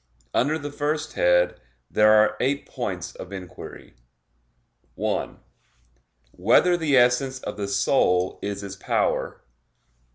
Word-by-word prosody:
Under 150 +5 +1
the 145 -1 -6
first 150 +1 -2
head 90 0 +2 0.3
there 105 - +4
are 110 0 +5
eight 140 +2 0
points - - -5
of - - -10
inquiry: 95 -3 -10 1.0
(1) - - -3 0.9
Whether 120 - +3
the 155 -5 +2
essence 125 +2 +3
of - - -5
the 100 -1 -4
soul 95 -2 +1
is 100 0 -4
its 100 -1 -7
power? 100 - -1
110 Hz, 120 wpm, -24 LUFS, 100-140 Hz, 1.0 s, are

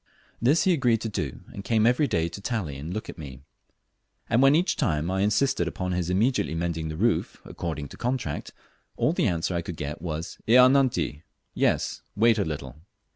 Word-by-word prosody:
This 140 +8 +4
he 185 - +4
agreed 125 -7 +2
to 115 - -3
do, 75 -10 -4
and 100 - -7
came 110 +2 +2
every 125 +5 +3
day 80 -7 0
to 85 +4 -8
tally 100 - -3
and 75 +5 -6
look 110 +3 -4
at - - -9
me; 70 -4 -9 0.9
and 120 - +4
when 135 +2 +6
I - - +6
each 175 - +1
time 75 +2 0
insisted 100 0 +1
upon 90 +2 -3
his 90 -1 -1
immediately 105 -1 +1
mending 80 -1 -2
the 80 - -5
roof 115 +6 0
according 75 -4 -5
to - - -12
contract, 120 - -3 0.5
all - - +2
the - - +1
answer 85 +1 -1
I 85 - 0
could 85 -1 -7
get 75 +2 -5
was, 80 -1 -5
"Ea 115 - +6
nanti," 130 - +1 0.3
(Yes, - - 0
wait 115 +1 +4
a - - +2
little.) 70 -4 -6
90 Hz, 195 wpm, -26 LUFS, 80-120 Hz, 0.9 s, when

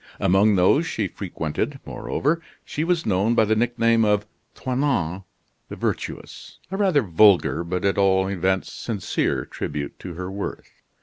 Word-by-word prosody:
Among 100 +3 +4
those 120 - +3
she 105 -3 -1
frequented, 85 -6 -4
moreover, 160 +4 -1 0.2
she 155 - -3
was 170 0 0
known 105 +4 +2
by 110 - +4
the 110 +1 +2
nickname 115 0 +2
of 105 -1 +2 0.3
"Toinon 125 - -1 0.4
the - - -6
Virtuous" - - -5
a 195 - -2
rather 185 -9 +3
vulgar 90 -3 +4
but, 90 +2 -3
at 100 0 +1
all 95 -1 +3
events, 95 0 -1
sincere 105 -6 -2
tribute 75 -1 -5
to 85 - -8
her 90 +2 -5
worth. 100 +1 -6
100 Hz, 145 wpm, -23 LUFS, 95-120 Hz, 0.4 s, Among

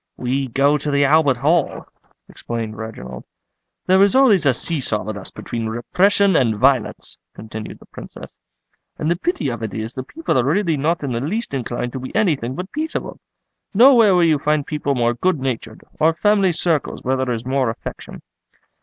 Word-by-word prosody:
"We 130 +2 -1
go 140 +4 +2
to 150 - -4
the 140 0 +2
Albert 145 -3 +3
Hall," 150 +5 0 0.4
explained 115 -2 -6
Reginald. 65 - -8 0.6
"There 190 +1 +4
is 200 +4 +4
always 220 - +5
a 135 - +4
see 165 +4 -2
saw 110 -5 -1
with 110 0 -5
us 100 - -7
between 115 -1 -5
repression 190 - +2
and 115 -7 +2
violence," 130 0 0 0.2
continued 110 0 -8
the - - -18
Princess; - - -12 0.6
"and 155 +2 -1
the - - +2
pity 175 - -2
of 120 -2 -5
it 110 -2 -5
is 110 +2 -4
the 130 - -5
people 310 - -2
are - - +2
really 165 +4 +1
not 155 +3 -1
in 140 - -2
the 115 0 -2
least 200 - -3
inclined 120 -1 -3
to 130 - -4
be 130 - -8
anything 145 - 0
but 185 +5 -6
peaceable. 315 +2 -4 0.6
Nowhere 230 -4 +6
will 175 - +4
you 160 -3 +3
find 150 0 0
people 145 -2 -2
more 120 -1 +1
good 180 +5 0
natured, 130 -3 -4 0.2
or 160 +1 +3
family 200 0 +3
circles 165 -3 -1
where 130 +1 0
there 130 -1 -2
is 115 0 -4
more 130 -2 0
affection." 115 - -8
140 Hz, 190 wpm, -20 LUFS, 120-175 Hz, 0.6 s, Nowhere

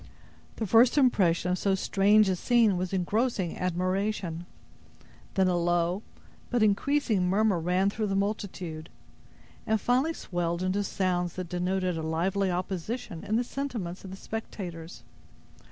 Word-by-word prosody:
The 225 - -2
first 230 +7 +5
impression 180 -10 +3
of 180 - 0
so 195 -1 +2
strange 205 +2 +4
a 190 - +1
scene 230 +1 +3
was 180 0 -2
engrossing 195 0 0
admiration. 185 -1 -1 0.9
Then 190 -1 +3
a 180 - +2
low, 175 +2 +1 0.5
but 240 -3 +2
increasing 215 -3 +2
murmur, 200 -1 +2
ran 180 +4 +1
through 215 0 -2
the 195 - -1
multitude, 190 -6 -3 0.8
and 220 0 +2
finally 260 +9 +1
swelled 175 - -3
into 190 +2 0
sounds 180 -3 -1
that 185 -2 -6
denoted 180 -1 -1
a - - -3
lively 180 +5 0
opposition 185 +2 -4
in 215 - -1
the 240 - +2
sentiments 235 -10 -5
of 190 - -8
the 190 - -8
spectators. 180 -6 -7
190 Hz, 140 wpm, -28 LUFS, 175-215 Hz, 0.9 s, first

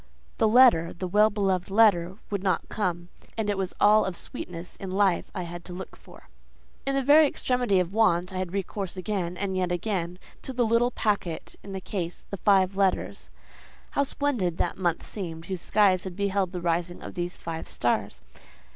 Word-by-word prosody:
The 220 - +4
letter—the 190 -7 +5
well 210 +4 +4
beloved 195 -3 0
letter—would 195 -1 +2
not 190 -1 0
come; 175 -4 -2 0.3
and 210 -2 0
it - - -1
was 190 -1 -2
all 215 +1 +6
of 185 -2 -3
sweetness 175 0 -7
in 195 - -6
life 190 -1 +1
I 180 - -2
had 175 0 -7
to 180 - -8
look 185 +1 -8
for. - - -17 0.6
In 275 - +1
the 275 - +1
very 295 +3 +7
extremity 250 -8 +1
of 180 +1 -1
want, 190 -4 +2
I 185 - -3
had 185 -2 -3
recourse 195 -1 -4
again, 185 -2 -3
and 190 0 -2
yet 180 -1 0
again, 175 -1 -2 0.2
to 265 - -6
the 245 -1 +1
little 230 +2 +3
packet 200 -9 -2
in 195 - -9
the 190 - -3
case—the 185 +1 -5
five 195 0 +3
letters. 195 -1 0 0.6
How - - +1
splendid 255 - -1
that - - -1
month 175 -3 0
seemed 165 -5 -6
whose 185 -1 -4
skies 190 -4 +3
had 185 -2 -6
beheld 200 -2 0
the 180 -2 -5
rising 175 +1 -1
of - - -7
these 175 0 -4
five 165 -1 -6
stars! 100 - -1
190 Hz, 180 wpm, -26 LUFS, 175-210 Hz, 0.6 s, very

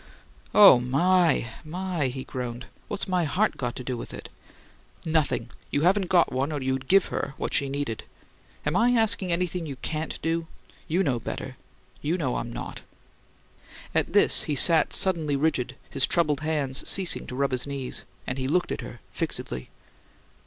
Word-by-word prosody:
"Oh, 200 -12 +9
my, 165 +5 +2 0.2
my!" 175 -2 -2
he 130 +1 -5
groaned. 125 -1 -6 0.2
"What's - - -3
my 180 -2 +1
heart 190 +8 +1
got 120 -2 -3
to 125 - -6
do 125 0 -3
with 115 - -7
it?" - - -9 0.8
"Nothing! 155 -7 0 0.2
You 145 - 0
haven't 185 +2 +2
got 175 -2 +4
one 135 +4 -1
or 150 - -2
you'd 130 0 -2
give 195 0 +4
her 135 - -3
what - - -4
she 140 - +2
needed. 140 -5 -3 0.6
Am 150 +3 0
I 235 +4 +4
asking 220 -5 +1
anything 175 -1 -1
you 140 - -5
CAN'T 155 +4 -4
do? 165 +1 -1 0.4
You 175 +4 +1
know 130 -7 0
better; - - -6 0.5
you 160 +5 0
know 135 -8 -1
I'm 120 - -4
not!" - - -7 1.1
At - - 0
this - - +5
he 150 - -1
sat 160 +2 +5
suddenly 165 -6 +3
rigid, 135 -3 0 0.2
his 135 -2 +1
troubled 150 -5 +1
hands 150 -4 0
ceasing 190 -3 +4
to 125 - -6
rub 140 +1 0
his 125 +1 -1
knees; 140 -2 -4 0.2
and 130 +1 -4
he 130 - -1
looked 175 +5 +1
at - - -3
her - - -10
fixedly. 60 0 -4
150 Hz, 175 wpm, -26 LUFS, 130-175 Hz, 1.1 s, Oh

